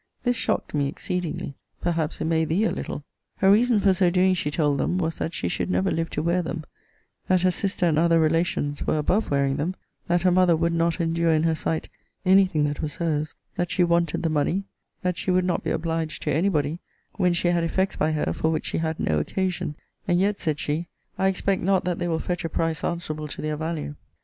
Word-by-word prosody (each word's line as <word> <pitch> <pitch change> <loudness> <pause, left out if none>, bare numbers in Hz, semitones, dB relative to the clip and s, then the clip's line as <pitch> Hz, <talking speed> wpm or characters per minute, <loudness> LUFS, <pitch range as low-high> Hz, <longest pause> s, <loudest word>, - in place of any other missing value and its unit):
This 245 -1 +2
shocked - - -1
me 145 -2 +1
exceedingly 175 -1 -3 0.3
perhaps 165 -2 -1
it - - -2
may 160 0 +2
thee 165 +7 +1
a 220 - +2
little!!! 145 - -5 0.3
Her 190 0 +4
reason 230 +1 +4
for 195 -1 +4
so 185 -1 +3
doing, 185 +1 +3
she 160 -5 -1
told 145 -2 +1
them, 180 - 0
was, 165 -3 -1
that 165 - -2
she - - -2
should - - -2
never 90 +1 +1
live 165 0 -1
to 150 - -3
wear 170 +2 +2
them: 165 -1 -4 0.6
that 185 -1 +3
her 185 - +4
sister, 185 0 0
and 160 -3 +3
other 165 0 +4
relations, 160 -2 0
were - - +2
above 185 +8 +1
wearing 140 -1 +1
them: 175 +6 -2 0.3
that 175 +1 +2
her 185 - +4
mother 180 -1 +4
would 170 +1 +1
not 170 +1 +1
endure 165 0 +1
in 155 0 +2
her 165 -1 +3
sight 160 0 -2 0.4
any 190 +1 +6
thing 155 -5 0
that 145 0 -1
was 150 -2 -4
her's: 155 -2 -1 0.2
that 175 0 0
she 180 - +2
wanted 170 -2 +1
the 165 - +1
money: 155 +6 +1 0.4
that 180 -1 0
she - - -3
would 185 0 +3
not 180 - 0
be - - -2
obliged 160 -1 -2
to - - 0
any 170 +7 +2
body, 150 -1 -1 0.4
when 180 -3 +3
she 175 0 +1
had 175 -1 +2
effects 190 +3 0
by 155 - +1
her 155 -1 0
for 160 - 0
which 160 - -1
she - - -1
had 160 -1 -2
no 75 -1 +1
occasion: 180 - -2 0.3
and 175 -1 +3
yet, 200 +2 +1
said 155 -4 -1
she, 155 +4 -2 0.3
I 190 - +3
expect 190 0 0
not 190 0 +2
that 180 -1 -1
they 175 - -1
will 165 -1 0
fetch 175 +2 -3
a 165 - -2
price 165 -2 -1
answerable 155 -3 -3
to - - -7
their 155 0 -1
value. 160 -1 -3
170 Hz, 235 wpm, -25 LUFS, 155-180 Hz, 0.6 s, any